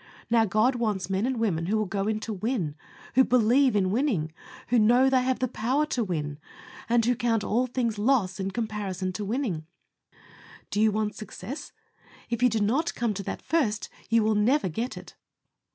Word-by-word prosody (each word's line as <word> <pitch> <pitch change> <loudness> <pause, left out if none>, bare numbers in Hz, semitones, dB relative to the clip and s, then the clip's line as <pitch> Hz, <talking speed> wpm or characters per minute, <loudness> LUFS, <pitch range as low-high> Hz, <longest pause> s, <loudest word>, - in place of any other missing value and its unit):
Now, 230 -1 +5
God 220 +6 +2
wants 205 -5 -1
men 195 +5 +1
and 260 -1 -1
women 175 -8 0
who 215 +3 +1
will 215 - +1
go 195 +1 -2
in 215 0 0
to 220 - -4
win, 205 - -2 0.4
who 260 - +6
believe 250 +1 +3
in 190 -2 +2
winning, 210 - 0 0.4
who 240 0 +4
know 245 +5 +5
they 260 -1 +4
have 255 0 0
the 255 - 0
power 255 +7 0
to 255 -6 -1
win, 150 -6 -3 0.5
and 235 -1 +3
who 245 - +3
count 230 -3 0
all 245 +4 +1
things 235 -4 -1
loss 205 -5 +1
in 190 0 -1
comparison 200 -4 -3
to 210 - -4
winning. 200 - -2 1.0
Do 210 - +1
you 220 0 +4
want 210 0 -1
success? 245 +6 -8 0.6
If 235 - -1
you 250 - +5
do 225 -1 0
not 265 +11 +1
come 235 -3 0
to 200 - -4
that - - -6
first, 230 -11 0 0.2
you 230 0 +4
will 215 0 +2
never 215 +2 +2
get 230 +10 -4
it. - - -11
220 Hz, 195 wpm, -27 LUFS, 200-245 Hz, 1.0 s, who